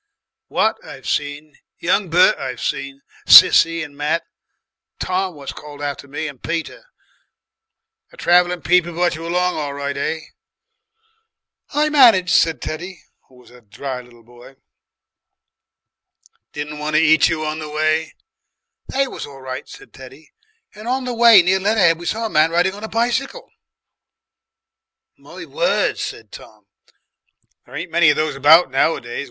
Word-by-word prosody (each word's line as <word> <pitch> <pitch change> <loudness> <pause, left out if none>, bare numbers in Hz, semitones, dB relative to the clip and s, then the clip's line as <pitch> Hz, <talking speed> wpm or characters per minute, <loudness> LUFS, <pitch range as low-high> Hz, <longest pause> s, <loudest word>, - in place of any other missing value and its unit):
Wat - - 0
I've - - -11
seen, 145 +1 -4 0.2
young 185 +2 0
Bert 180 +3 +4
I've 130 -3 -6
seen, 140 0 -4 0.3
Sissie 165 0 +7
and 145 -2 -11
Matt, 150 +3 -1 0.8
Tom 185 -1 -2
what's 140 -2 -8
called 145 -1 -12
after 145 0 -5
me, 145 +3 -5
and 140 -4 -11
Peter. 170 - -5 1.2
The - - -20
traveller 175 0 +2
people 175 +2 +1
brought 175 +1 0
you 165 +2 -7
along 180 +1 -1
all 145 -2 -4
right, 140 0 -4
eh?" 160 +3 -3 1.5
"I 300 +1 +2
managed," 230 - +5
said 165 -1 +2
Teddy, 175 +3 -7 0.2
who 130 - -23
was 125 -1 -20
a 125 0 -17
dry 125 +4 -7
little 120 -1 -20
boy. 120 +3 -17 2.0
"Didn't 150 0 -7
want 150 +1 -3
to 155 - +4
eat 160 0 +4
you 155 -1 -3
on 155 +1 -4
the 155 -1 -7
way?" 155 +1 -1 0.7
"They 275 0 -1
was - - -8
all 135 -1 -13
right," 130 0 -7
said - - -14
Teddy, 135 +4 -15 0.4
"and 215 +2 -11
on 255 +1 -2
the 250 - -3
way 230 -5 +7
near 190 +2 +2
Leatherhead 195 -5 +2
we 175 - -8
saw 225 +1 -2
a - - 0
man 155 +1 +3
riding 175 +3 +1
on 205 +2 -11
a - - -4
bicycle." 250 - -2 1.6
"My - - -12
word!" - - -1
said - - -7
Tom, - - -14 1.0
"there - - -13
ain't 170 0 -6
many 170 -2 +4
of 150 - +3
those 155 -1 -2
about 150 +2 +5
nowadays. 135 -3 -1
160 Hz, 155 wpm, -19 LUFS, 145-180 Hz, 2.0 s, Sissie